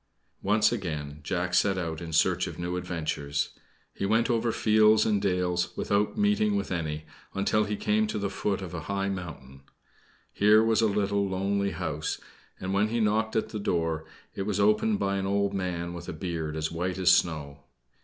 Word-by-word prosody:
Once 105 Hz, +3 st, +3 dB
again, 75 Hz, -9 st, -4 dB
Jack 90 Hz, +3 st, -2 dB
set 95 Hz, +1 st, +3 dB
out 80 Hz, -3 st, -3 dB
in 85 Hz, -1 st, -6 dB
search 75 Hz, -, +2 dB
of -, -, -7 dB
new 85 Hz, +1 st, -3 dB
adventures. 80 Hz, -5 st, -2 dB, 0.4 s
He -, -, -5 dB
went 110 Hz, +5 st, +2 dB
over 115 Hz, 0 st, +1 dB
fields 110 Hz, 0 st, +4 dB
and 105 Hz, -2 st, +2 dB
dales 90 Hz, -2 st, 0 dB
without 105 Hz, -, 0 dB
meeting 210 Hz, 0 st, +2 dB
with 205 Hz, -, -2 dB
any, 80 Hz, -3 st, -3 dB, 0.3 s
until 105 Hz, +2 st, +2 dB
he 105 Hz, 0 st, -2 dB
came 215 Hz, -, +1 dB
to -, -, -3 dB
the 100 Hz, -1 st, -2 dB
foot 100 Hz, -1 st, -1 dB
of 90 Hz, -, -7 dB
a 90 Hz, -, -3 dB
high 100 Hz, 0 st, 0 dB
mountain. 70 Hz, -8 st, -7 dB, 0.7 s
Here 105 Hz, +2 st, +5 dB
was 115 Hz, 0 st, +3 dB
a 110 Hz, -, +4 dB
little, 100 Hz, -1 st, 0 dB
lonely 100 Hz, +1 st, 0 dB
house; 80 Hz, -4 st, -3 dB, 0.4 s
and 95 Hz, +1 st, -3 dB
when 100 Hz, +2 st, +3 dB
he 115 Hz, +2 st, -1 dB
knocked 110 Hz, +1 st, +1 dB
at 110 Hz, -, 0 dB
the 110 Hz, -, -4 dB
door 80 Hz, -5 st, -1 dB, 0.3 s
it -, -, -5 dB
was 105 Hz, -1 st, 0 dB
opened 105 Hz, -, +3 dB
by 100 Hz, -, 0 dB
an 95 Hz, 0 st, -2 dB
old 100 Hz, 0 st, +1 dB
man 85 Hz, -2 st, -3 dB
with 85 Hz, 0 st, -7 dB
a -, -, -4 dB
beard 80 Hz, -2 st, -4 dB
as 80 Hz, 0 st, -2 dB
white 90 Hz, +3 st, -2 dB
as 90 Hz, -1 st, +5 dB
snow. 75 Hz, -5 st, +1 dB
95 Hz, 190 wpm, -28 LUFS, 85-105 Hz, 0.7 s, Here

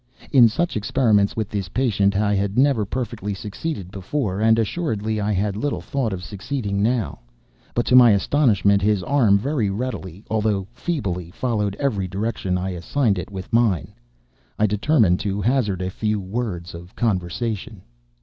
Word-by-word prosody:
In 125 Hz, -4 st, +7 dB
such 170 Hz, +10 st, -1 dB
experiments 110 Hz, -2 st, +2 dB
with 110 Hz, -3 st, -2 dB
this 100 Hz, -4 st, -3 dB
patient, 100 Hz, -4 st, +1 dB
I 105 Hz, 0 st, +2 dB
had 100 Hz, +1 st, -1 dB
never 130 Hz, -5 st, +3 dB
perfectly 110 Hz, -3 st, -4 dB
succeeded 100 Hz, -, -5 dB
before, 100 Hz, 0 st, -2 dB
and 110 Hz, 0 st, +4 dB
assuredly 110 Hz, -, -1 dB
I 105 Hz, +1 st, 0 dB
had 100 Hz, 0 st, 0 dB
little 140 Hz, +7 st, -2 dB
thought 130 Hz, -6 st, -2 dB
of 90 Hz, -1 st, -5 dB
succeeding 100 Hz, +1 st, -3 dB
now; 115 Hz, -, 0 dB, 0.6 s
but 120 Hz, -, +1 dB
to 125 Hz, -, +3 dB
my 125 Hz, -2 st, +9 dB
astonishment, 100 Hz, -2 st, +3 dB
his 100 Hz, -2 st, +1 dB
arm 115 Hz, -7 st, +4 dB
very 120 Hz, -1 st, -1 dB
readily, 100 Hz, -4 st, -5 dB
although 105 Hz, -3 st, 0 dB
feebly, 100 Hz, -, -3 dB
followed 105 Hz, -1 st, -1 dB
every 105 Hz, -10 st, 0 dB
direction 95 Hz, -1 st, -2 dB
I 95 Hz, +1 st, -2 dB
assigned 100 Hz, +4 st, 0 dB
it 90 Hz, -, -6 dB
with 95 Hz, 0 st, -8 dB
mine. 110 Hz, -, +2 dB, 0.6 s
I 105 Hz, -, +3 dB
determined 105 Hz, -, +2 dB
to 100 Hz, -1 st, -2 dB
hazard 105 Hz, -4 st, 0 dB
a 90 Hz, -, -3 dB
few 105 Hz, +1 st, -1 dB
words 95 Hz, -3 st, -4 dB
of 85 Hz, +2 st, -11 dB
conversation. 110 Hz, +1 st, -2 dB
105 Hz, 160 wpm, -22 LUFS, 95-120 Hz, 0.6 s, my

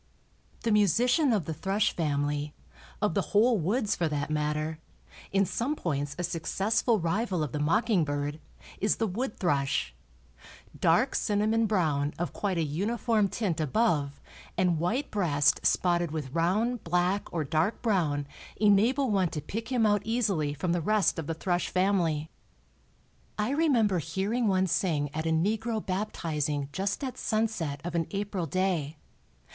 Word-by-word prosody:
The 230 Hz, -, +1 dB
musician 240 Hz, -, +3 dB
of 205 Hz, -8 st, +1 dB
the 160 Hz, -, -3 dB
thrush 195 Hz, +6 st, 0 dB
family, 145 Hz, -2 st, -1 dB, 0.5 s
of 210 Hz, -, +2 dB
the -, -, +2 dB, 0.2 s
whole 230 Hz, 0 st, +4 dB
woods 210 Hz, +6 st, 0 dB
for 170 Hz, -, 0 dB
that 150 Hz, -1 st, -2 dB
matter, 150 Hz, +1 st, -1 dB, 0.5 s
in 195 Hz, 0 st, +3 dB
some 245 Hz, -, -1 dB
points 145 Hz, -, -2 dB
a 180 Hz, -, -3 dB
successful 195 Hz, +7 st, 0 dB
rival 185 Hz, 0 st, 0 dB
of 145 Hz, -, -3 dB
the 150 Hz, -, -3 dB
mocking 205 Hz, +5 st, +2 dB
bird, 145 Hz, +1 st, -3 dB, 0.4 s
is 210 Hz, -, +2 dB
the 225 Hz, -, 0 dB
wood 220 Hz, +5 st, -3 dB
thrush. 140 Hz, -, 0 dB, 0.9 s
Dark -, -, +3 dB
cinnamon 215 Hz, +2 st, +1 dB
brown, 155 Hz, -8 st, 0 dB
of 175 Hz, -, -3 dB
quite 195 Hz, -4 st, -2 dB
a 165 Hz, -, +1 dB
uniform 210 Hz, -, 0 dB
tint 185 Hz, -8 st, -2 dB
above 150 Hz, -, +1 dB, 0.4 s
and 180 Hz, -3 st, +2 dB
white 230 Hz, -, -1 dB
breast 145 Hz, -8 st, +2 dB
spotted 175 Hz, -2 st, +2 dB
with 150 Hz, -4 st, -5 dB
round, 210 Hz, +8 st, +1 dB
black, 180 Hz, +4 st, 0 dB
or 165 Hz, -2 st, -1 dB
dark 160 Hz, -, 0 dB
brown 160 Hz, -10 st, +1 dB, 0.3 s
enable 220 Hz, +6 st, +3 dB
one 190 Hz, -4 st, +2 dB
to 155 Hz, -, -4 dB
pick 225 Hz, -, -6 dB
him 240 Hz, -3 st, +2 dB
out 205 Hz, -2 st, +3 dB
easily 205 Hz, -10 st, 0 dB
from 160 Hz, +5 st, -2 dB
the 175 Hz, 0 st, +1 dB
rest 210 Hz, 0 st, +2 dB
of 155 Hz, -, -5 dB
the 165 Hz, -, -2 dB
thrush 175 Hz, +1 st, -1 dB
family. 175 Hz, -5 st, +1 dB, 1.1 s
I 210 Hz, +4 st, 0 dB
remember 245 Hz, -, +2 dB
hearing 195 Hz, +9 st, -1 dB
one 190 Hz, -1 st, +3 dB
sing 155 Hz, -5 st, 0 dB
at 160 Hz, +1 st, -2 dB
a -, -, +1 dB
negro 215 Hz, +7 st, 0 dB
"baptizing" 155 Hz, -7 st, -2 dB
just 195 Hz, -, -2 dB
at 260 Hz, -2 st, -4 dB
sunset 215 Hz, -, -1 dB
of 175 Hz, 0 st, -4 dB
an 165 Hz, -2 st, 0 dB
April 200 Hz, -4 st, -3 dB
day. 170 Hz, -4 st, -1 dB
180 Hz, 155 wpm, -28 LUFS, 155-215 Hz, 1.1 s, whole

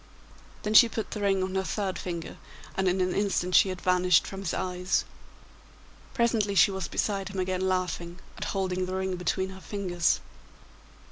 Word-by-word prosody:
Then 210 Hz, -, -1 dB
she 235 Hz, +2 st, +8 dB
put 220 Hz, -1 st, -4 dB
the 210 Hz, -, -4 dB
ring 195 Hz, -2 st, +2 dB
on 185 Hz, 0 st, -3 dB
her 190 Hz, 0 st, 0 dB
third 195 Hz, -1 st, -2 dB
finger, 170 Hz, -2 st, -5 dB, 0.4 s
and 190 Hz, 0 st, +1 dB
in 185 Hz, +1 st, +2 dB
an 180 Hz, 0 st, +1 dB
instant 195 Hz, -3 st, 0 dB
she 195 Hz, -, +6 dB
had 185 Hz, -1 st, -4 dB
vanished 180 Hz, -2 st, +3 dB
from 195 Hz, -, -7 dB
his 185 Hz, -4 st, -2 dB
eyes. 180 Hz, 0 st, -1 dB, 1.1 s
Presently 225 Hz, -4 st, +1 dB
she 195 Hz, +2 st, +6 dB
was 190 Hz, -3 st, -3 dB
beside 195 Hz, -2 st, -1 dB
him 195 Hz, -1 st, -5 dB
again 185 Hz, 0 st, -1 dB
laughing, 180 Hz, -2 st, -2 dB, 0.2 s
and -, -, -6 dB
holding 185 Hz, -2 st, -1 dB
the 185 Hz, -, -3 dB
ring 190 Hz, 0 st, -1 dB
between 190 Hz, +2 st, -1 dB
her 190 Hz, 0 st, -11 dB
fingers. 180 Hz, -5 st, 0 dB
190 Hz, 180 wpm, -28 LUFS, 180-195 Hz, 1.1 s, she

